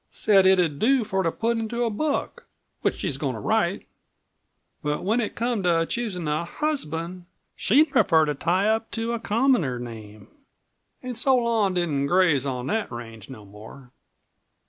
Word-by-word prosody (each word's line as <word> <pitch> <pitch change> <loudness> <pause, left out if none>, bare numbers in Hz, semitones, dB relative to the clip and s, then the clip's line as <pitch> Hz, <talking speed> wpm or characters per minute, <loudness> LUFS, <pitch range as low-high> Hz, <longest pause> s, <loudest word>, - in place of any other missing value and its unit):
Said 195 -3 +3
it'd 175 -6 +3
do 260 +1 +3
for 195 -3 -1
to 165 -3 0
put 230 +4 -1
into 235 +2 -2
a 230 - 0
book 290 +7 -3 0.3
which - - 0
she's - - -3
goin' - - -2
to - - -6
write, - - 0 1.0
but 150 -1 -2
when 220 +6 +1
it 215 - -4
come 235 -2 -1
to 170 -2 +2
choosin' 200 -9 -3
a 150 +2 0
husband 175 - -3 0.3
she'd 285 +7 +3
prefer 160 -10 +4
to 150 - -1
tie 180 +7 0
up 220 +1 0
to 230 +1 -3
a 235 - -2
commoner 225 - +1
name. 110 -3 -9 0.8
An' 250 0 -4
so 260 +3 +2
Lon 230 -6 +1
didn't 150 -6 0
graze 165 -6 +3
on 125 -2 -3
that 220 +7 -2
range 115 -3 -9
no 110 -6 -10
more." 110 +6 -13
185 Hz, 170 wpm, -24 LUFS, 150-230 Hz, 1.0 s, prefer